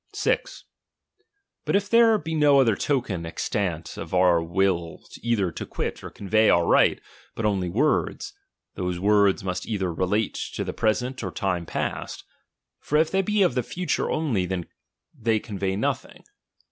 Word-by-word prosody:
(t. - - -1
Hut 410 - -7
if 200 0 +1
there 230 0 +5
be 160 -3 -5
no 145 -3 +5
other 115 -6 +4
token 115 - -1
extant 85 -1 -3
of 85 +2 -5
our 90 -2 +4
will 85 -1 -1 0.2
either 110 -7 0
to - - -6
quit - - -4
or - - -6
convey 110 +2 +2
our 85 0 +4
right, - - +4 0.4
hut 115 - -2
only 95 -4 0
words; 125 - 0 0.4
those 90 -2 -3
words 100 0 +3
must 90 -1 -3
either 95 -6 -2
relate 100 +5 0 0.2
to - - -2
the - - -4
pre 110 -2 +2
sent 125 0 -5
or 95 - -2
time 90 -2 -2
past; - - -4 0.6
for 150 - 0
if 160 +1 +2
they 195 - +2
be 210 +1 +2
of 180 - +2
the 125 - +1
future 180 +7 -2
only, 120 - 0 0.7
they 110 -1 +1
convey 100 -3 -3
nothing. 105 - -3
105 Hz, 160 wpm, -25 LUFS, 90-140 Hz, 0.7 s, there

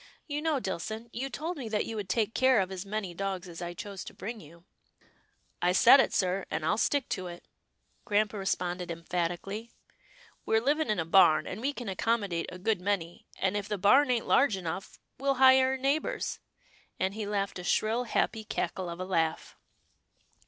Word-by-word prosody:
" - - -40
You 295 - -1
know, 310 -3 +1
Dillson, 220 +3 -5
you 265 +3 -3
told 325 +6 -4
me 245 -5 -5
that 215 -1 0
you 225 - -5
would 205 -3 -5
take 220 +2 +1
care 260 -2 +4
of 190 -1 -1
as 190 +1 -6
many 200 -3 -3
dogs 190 0 -3
as 170 0 -9
I 175 0 -5
chose 200 0 -7
to - - -10
bring 225 +2 -6
to - - -13
you." 170 +3 -17 0.5
" - - -38 0.3
I 180 +1 +3
said 240 +8 +8
it, - - +3
sir, 185 0 0
and 160 - -2
Til 160 - +1
stick 285 +1 +1
to 185 -3 -3
it," 175 0 -10 0.6
grampa 210 0 +1
re 195 - -5
sponded 180 0 -2
emphatically. 175 +6 -3 0.4
" - - -27
We're 220 - +4
living 290 +4 +1
in 215 - +1
a 165 - -1
barn, 165 -3 +5
and 215 - -6
we 275 +3 0
can 245 -5 -7
accommodate 195 -3 -1
a 180 - -8
good 195 +1 0
many, 180 -3 -2
and 190 +1 0
if 205 -1 -2
the 210 - -1
barn 255 +9 +5
ain't 240 -2 +1
large 240 -7 +4
enough, 185 +2 -5 0.2
we'll 275 0 +1
hire 260 0 +6
a - - -4
neighbour's," 275 +4 -1 0.6
and 190 +1 0
he 215 -1 -4
laughed 200 -2 -2
a - - -7
shrill, 225 +6 +1
happy 220 -1 0
cackle 185 -3 -3
of 170 +1 -7
a 185 - -3
laugh. 165 -4 -1
200 Hz, 210 wpm, -29 LUFS, 180-235 Hz, 0.6 s, said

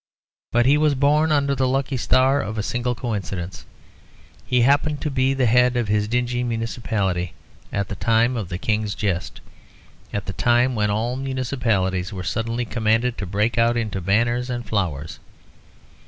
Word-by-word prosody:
But 120 0 +3
he 145 +3 +4
was 150 -2 +3
born 150 +3 +3
under 140 -2 +2
the 130 -1 +1
lucky 135 +1 0
star 130 +3 +3
of 110 +2 -5
a 105 - -1
single 120 +2 -1
coincidence. 100 -6 -4 0.8
He 125 -1 +3
happened 145 +4 +3
to 150 - -2
be 130 0 +2
at - - -5
the 130 - +3
head 125 +2 +4
of 120 -4 -1
his 105 0 +1
dingy 125 +1 0
municipality 115 -6 -2 0.4
at 100 -1 -1
the 100 - -5
time 115 +3 +2
of 105 -7 -4
the 85 - -3
King's 105 0 -1
jest, 85 -7 -3 0.7
at 100 -1 -3
the 95 - -4
time 120 +4 +2
when 105 -2 0
all 115 +4 -1
municipalities 120 -8 -1
were 95 -3 -5
suddenly 115 +4 -2
commanded 115 +1 +1
to 100 - -4
break 105 +5 0
out 115 +1 +3
into 105 -5 -2
banners 120 +7 +1
and 120 -1 -3
flowers. 85 -8 -2
115 Hz, 170 wpm, -22 LUFS, 105-125 Hz, 0.8 s, he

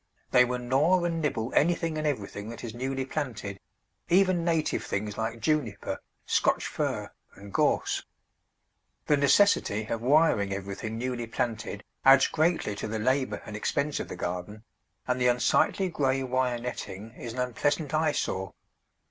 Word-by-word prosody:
They 125 0 +6
will 125 0 -2
gnaw 135 +9 +2
and 165 -1 -1
nibble 125 -6 -1
anything 165 0 +2
and 155 0 -1
everything 105 -5 -3
that 115 - -8
is 115 -2 -5
newly 130 +2 -2
planted, 115 -9 -4 0.5
even 185 -1 +4
native 165 -2 0
things 105 +1 -3
like 115 +1 -3
Juniper, 150 -10 -1 0.3
Scotch - - +2
Fir, - - -2 0.2
and 100 0 -12
Gorse. - - +1 1.0
The 150 - +4
necessity 140 - +3
of 115 +1 -3
wiring 125 -7 +3
everything 100 +3 -5
newly 120 -1 -3
planted 115 -3 -3 0.2
adds 135 0 +7
greatly 160 -8 +1
to - - -4
the 110 +1 -3
labour 130 -2 0
and 105 - -7
expense 140 +7 -1
of - - -4
the - - -6
garden, 90 +5 -5 0.4
and 125 0 0
the 125 - +4
unsightly 125 +10 +2
grey 135 -5 0
wire 130 -1 0
netting 115 -3 -6
is 120 -2 -7
an - - -9
unpleasant 145 +5 0
eyesore. 145 - 0
125 Hz, 150 wpm, -28 LUFS, 110-150 Hz, 1.0 s, adds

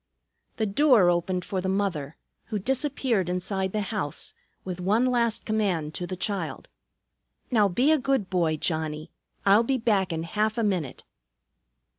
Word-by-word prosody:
The 220 - +1
door 215 -4 +5
opened 180 +1 -1
for 190 -2 -2
the 190 - -2
mother, 180 -7 -2 0.3
who 220 - -3
disappeared 255 - 0
inside 190 +1 -2
the 215 - -1
house, 170 -9 -3 0.3
with 180 -1 -5
one 210 +7 +2
last 235 -3 +1
command 190 -8 0
to 175 - -4
the 185 - -5
child: 200 +1 -3 0.8
"Now 215 -4 +4
be 245 - +2
a 315 - +4
good 265 -6 0
boy, 170 -4 +1
Johnnie. 155 0 -2 0.3
I'll 200 +2 +6
be 260 +3 0
back 210 -6 +1
in 160 0 -2
half 215 +6 -1
a 230 - +1
minute." 180 - -2
195 Hz, 155 wpm, -26 LUFS, 175-225 Hz, 0.8 s, I'll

